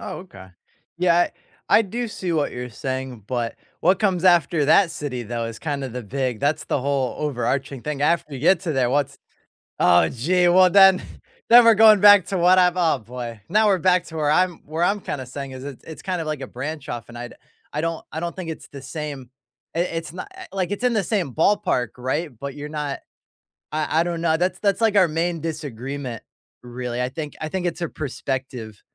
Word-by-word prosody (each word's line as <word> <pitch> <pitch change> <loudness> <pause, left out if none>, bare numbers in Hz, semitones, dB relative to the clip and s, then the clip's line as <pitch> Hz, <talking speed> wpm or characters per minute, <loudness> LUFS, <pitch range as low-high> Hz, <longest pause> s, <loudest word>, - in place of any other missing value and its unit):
Oh, - - -6
okay. 160 - -12 0.5
Yeah, 175 -1 +3 0.4
I 225 - +6
do 235 +4 -4
see 185 -4 -4
what 155 -3 0
you're 125 0 -5
saying, 130 -1 -5
but 120 -1 -3 0.2
what 185 +2 +3
comes 185 -4 +1
after 170 -4 +4
that 170 +4 +5
city, 145 -6 -4
though, 115 +1 -4
is 115 -1 -6
kinda 140 -3 -3
the 125 +1 -6
big 125 +1 -3
that's 145 +2 0
the - - -1
whole 135 -2 -1
overarching 135 -1 -2
thing, 150 -2 -3
after 155 -1 +1
you 130 - -6
get 170 +4 +4
to 175 -4 -2
there, 130 -3 +1
what's 145 0 0 0.6
Oh, 90 0 +5
gee, 175 +9 +1
well, 185 +1 +6
then 190 0 +7 0.5
then 240 +1 +9
we're 230 - +8
going 215 -1 +7
back 205 -2 +8
to 195 - -2
what 180 +1 +5
I've 180 0 +3
Oh, 170 -3 +2
boy, 115 0 -8
now 215 +4 +4
we're 195 - +4
back 180 +1 +3
to 160 - -11
where 150 -1 +1
I'm 180 +1 +1
where 160 +3 -2
I'm 200 +4 +2
kinda 130 -7 -5
saying 135 +2 -7
is 130 0 -8
it's 140 -2 -9
it's 160 - -10
kind 180 -3 -2
of 160 - -5
like 155 -2 -3
a 135 - -5
branch 145 +4 -6
off, 120 -2 -6
and 120 - -10
I 120 0 -6
d - - -15 0.4
I 150 - -1
don't 165 0 -3
I 160 - -4
don't 170 0 -4
think 185 -3 -6
it's 160 - -7
the 140 -2 -10
same, 140 -2 -6 0.5
i - - 0
it's 165 -2 -4
not 185 - -7
eh - - -9
like, 190 -1 -2
it's 205 +4 -4
in 245 - +3
the 215 -3 +1
same 180 - -1
ballpark, 155 - +1
right, 130 +6 -2
but 140 0 -6
you're 150 0 -7
not 150 -2 -4 0.7
I 155 +1 +1
I - - +2
don't 170 -1 -3
know, 160 -1 +2
that's 180 +2 -1
that's, 200 0 +1
like, 220 -2 +3
our 190 -3 +6
main 165 +1 -1
disagreement, 140 -5 -5 0.4
really. 125 0 -4
I 125 - -1
think 150 +2 -6
I 155 - -3
think 185 +2 -3
it's 175 0 -3
a 170 - -2
perspective 130 -6 -5
155 Hz, 220 wpm, -22 LUFS, 130-180 Hz, 0.7 s, then